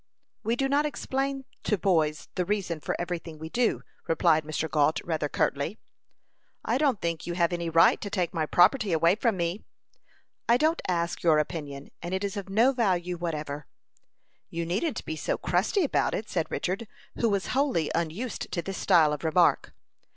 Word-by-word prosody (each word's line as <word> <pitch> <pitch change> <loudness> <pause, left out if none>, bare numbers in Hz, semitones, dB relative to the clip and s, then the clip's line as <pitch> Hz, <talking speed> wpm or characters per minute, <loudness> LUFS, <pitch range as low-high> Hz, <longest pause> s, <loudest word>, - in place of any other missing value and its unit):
"We 230 +2 0
do 270 +2 0
not 290 +2 +2
explain 270 -1 -2 0.2
to 210 - 0
boys 160 -5 +1
the 180 - 0
reason 180 -4 -2
for - - -3
every 175 0 -3
thing 165 -2 -10
we 160 +1 -7
do," 240 +5 0 0.2
replied 160 -1 +3
Mr. 155 +1 -2
Gault, 150 +1 +2
rather 155 -3 -2
curtly. 145 +10 -1 0.9
"I 235 +4 +1
don't 275 -8 +2
think 170 -2 -3
you 175 - -3
have 170 0 +2
any 170 -1 -2
right 165 0 +5
to 205 - -4
take 180 -4 -1
my 160 -3 -1
property 195 - +4
away 165 +2 +4
from 225 -1 0
me." 170 +4 -2 0.9
"I 235 - +6
don't 315 +4 +1
ask 170 -1 -1
your 160 -3 +4
opinion, 145 -3 -4
and 175 +2 -3
it 190 - -2
is 200 0 -2
of 200 -1 -5
no 225 +7 +4
value 180 -8 0
whatever." 150 -4 -4 0.8
"You 170 0 -3
needn't 200 - -2
be 160 - -3
so 155 - -2
crusty 195 - +1
about 285 - +1
it," 215 - -4
said 165 -5 -2
Richard, 195 +5 -2 0.3
who 230 - +2
was 200 -1 -1
wholly 260 - +1
unused 175 +9 -3
to 170 - -1
this 195 +2 -5
style 160 -6 +4
of 150 - -5
remark. 170 +2 +3
175 Hz, 185 wpm, -27 LUFS, 160-215 Hz, 0.9 s, I